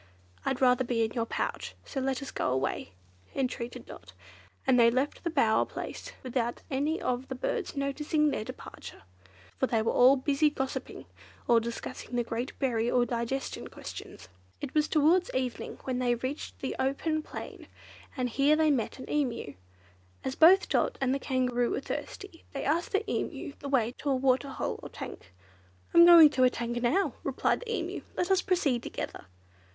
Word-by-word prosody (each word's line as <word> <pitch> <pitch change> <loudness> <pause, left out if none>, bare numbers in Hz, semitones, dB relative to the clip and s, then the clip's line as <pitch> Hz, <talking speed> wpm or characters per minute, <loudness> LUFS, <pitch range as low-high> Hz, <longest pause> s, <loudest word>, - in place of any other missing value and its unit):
"I'd 265 -1 -1
rather 250 0 +4
be 235 -2 +1
in 220 - -5
your 230 -1 -2
pouch, - - -3
so 275 - -4
let 265 +1 -1
us 275 - -7
go - - -1
away," 130 -6 -2 0.4
entreated 250 -2 -3
Dot; 95 +1 -12 0.5
and 250 - +4
they 230 -1 +7
left 260 +4 -1
the 340 - 0
bower 230 -9 +3
place - - -7
without 240 -2 -2
any 290 +5 0
of 250 +1 -2
the 260 - -5
birds 360 - -3
noticing 295 +2 +1
their 215 - -2
departure, - - -10 0.6
for 260 - +2
they 225 -3 +1
were - - +1
all 255 +2 +6
busy 280 +3 +2
gossiping, 265 -2 -5 0.4
or 235 -1 +6
discussing 235 +1 -6
the 240 - +2
great 235 +3 -4
berry 235 -4 0
or 245 -1 +3
digestion 240 +3 -3
questions. - - -9 0.3
It 280 - -6
was 305 0 +3
towards 330 +4 +3
evening 255 -2 -3
when 255 -1 -2
they 245 -1 +2
reached 260 +5 -5
an 265 - -1
open 310 +4 0
plain, - - -9 0.5
and 255 -1 0
here 275 +5 +3
they 310 -1 +3
met 245 -6 -1
an 260 - -9
Emu. 250 - -1 0.7
As 265 - -2
both 355 +7 +6
Dot - - +1
and 265 -2 +1
the 275 - -1
Kangaroo 250 -3 0
were - - -1
thirsty, 330 +5 -7
they 275 - -3
asked 325 +5 0
the 415 +2 0
Emu - - -3
the 280 - -6
way 240 -4 +2
to 290 - -2
a 270 - +3
waterhole 265 +1 0
or - - -8
tank. 85 - -9 0.6
"I - - +6
am 340 - +11
going 330 -4 +10
to 255 - +2
a 255 - +7
tank 240 -1 -3
now," 265 +12 +2
replied - - 0
the 475 -1 -6
Emu; 365 -4 -3 0.2
"let 360 +2 0
us 380 -1 +4
proceed 295 -10 +1
together." 100 - -6
265 Hz, 180 wpm, -29 LUFS, 240-300 Hz, 0.7 s, am